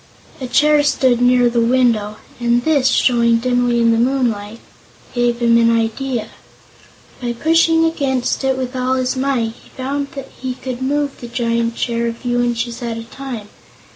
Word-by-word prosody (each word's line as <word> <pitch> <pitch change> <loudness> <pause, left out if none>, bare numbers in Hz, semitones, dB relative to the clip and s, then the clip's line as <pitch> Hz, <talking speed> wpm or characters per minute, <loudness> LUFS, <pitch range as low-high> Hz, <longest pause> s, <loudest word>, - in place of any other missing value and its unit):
A 260 - -5
chair 300 +3 +4
stood 260 -4 +2
near 245 0 +4
the 235 0 +1
window, 230 -4 +2 0.2
and 240 0 +1
this 290 -5 +2
showing 235 -2 +3
dimly 245 0 +1
in 230 0 +4
the 230 - +2
moonlight 230 -4 -1 0.5
gave 240 -1 +1
him 235 0 +5
an 230 0 +4
idea. 230 0 -1 0.9
By 240 -1 -2
pushing 325 +4 +3
against 275 -6 -1
it 265 -1 +1
with 255 0 -4
all 255 0 0
his 255 0 -1
might, 260 -4 -1
he - - -19
found 280 +2 -2 0.3
he 255 -1 -3
could 255 -1 -6
move 285 +1 -1
the 240 - -7
giant 235 -1 -1
chair 235 -1 -1
a 230 - -2
few 245 0 -1
inches 235 0 -2
at 235 -1 -3
a 230 - -6
time. 235 -3 -8
245 Hz, 170 wpm, -18 LUFS, 235-265 Hz, 0.9 s, him